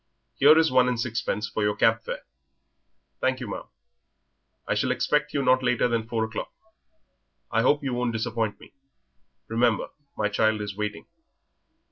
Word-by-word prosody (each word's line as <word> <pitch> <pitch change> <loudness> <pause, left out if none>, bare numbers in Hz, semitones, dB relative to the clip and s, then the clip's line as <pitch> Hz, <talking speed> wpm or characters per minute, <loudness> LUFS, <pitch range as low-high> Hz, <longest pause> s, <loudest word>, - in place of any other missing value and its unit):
Here 150 +3 +6
is 160 -2 +4
one 130 -1 +4
and 125 -2 -1
sixpence 115 -2 -2
for 110 - -3
your 105 0 +1
cab 115 0 +3
fare." - - -6 1.0
"Thank 130 0 0
you, 125 - -5
ma'am." 100 - -6 1.0
"I - - +1
shall 130 - 0
expect 140 +4 +1
you 140 - -1
not 130 0 +4
later 125 -1 +2
than 115 -2 -1
four 115 -1 -1
o'clock. 110 -1 -5 1.0
I 115 - +2
hope 145 +4 +2
you 135 -2 -2
won't 120 0 0
disappoint 110 -1 -2
me; - - -16 0.7
remember 115 -1 +1 0.3
my 105 - +1
child 110 +1 +1
is 105 -1 -5
waiting." 105 0 -4
115 Hz, 160 wpm, -26 LUFS, 110-130 Hz, 1.0 s, Here